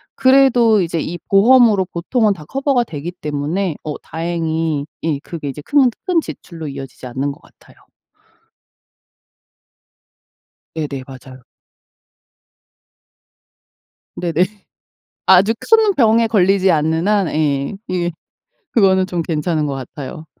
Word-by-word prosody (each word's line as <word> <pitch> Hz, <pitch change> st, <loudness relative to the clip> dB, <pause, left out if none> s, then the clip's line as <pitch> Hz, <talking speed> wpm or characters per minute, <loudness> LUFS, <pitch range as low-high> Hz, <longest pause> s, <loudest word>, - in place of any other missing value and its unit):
그래도 250 Hz, -5 st, +4 dB
이제 165 Hz, -2 st, -2 dB
이 175 Hz, +3 st, -4 dB
보험으로 215 Hz, -1 st, +5 dB
보통은 205 Hz, +5 st, 0 dB
다 165 Hz, -6 st, -12 dB
커버가 270 Hz, -, 0 dB
되기 165 Hz, -4 st, -6 dB
때문에 155 Hz, +2 st, -3 dB
어 150 Hz, -, -4 dB
다행히 160 Hz, -3 st, -2 dB, 0.2 s
예 155 Hz, -3 st, -1 dB
그게 155 Hz, 0 st, -7 dB
이제 140 Hz, +2 st, -7 dB
큰 275 Hz, -, +3 dB, 0.2 s
큰 360 Hz, -3 st, +2 dB
지출로 165 Hz, -, -9 dB
이어지지 135 Hz, -2 st, -8 dB
않는 135 Hz, +3 st, -3 dB
것 -, -, -13 dB
같아요. -, -, -22 dB, 3.0 s
네네. 145 Hz, -4 st, -4 dB
맞아요. 130 Hz, -1 st, -12 dB, 2.7 s
네네. 175 Hz, 0 st, +1 dB, 0.8 s
아주 190 Hz, +4 st, +6 dB
큰 445 Hz, -2 st, +3 dB
병에 230 Hz, -2 st, +4 dB
걸리지 195 Hz, -3 st, +3 dB
않는 160 Hz, +3 st, +1 dB
한 205 Hz, -3 st, +2 dB
예 145 Hz, +1 st, -1 dB
이게 175 Hz, -1 st, -1 dB, 0.6 s
그거는 190 Hz, -4 st, +3 dB
좀 180 Hz, -2 st, -3 dB
괜찮은 155 Hz, -1 st, -1 dB
것 140 Hz, -, -3 dB
같아요. 135 Hz, +4 st, -8 dB
170 Hz, 230 characters per minute, -18 LUFS, 150-210 Hz, 3.0 s, 아주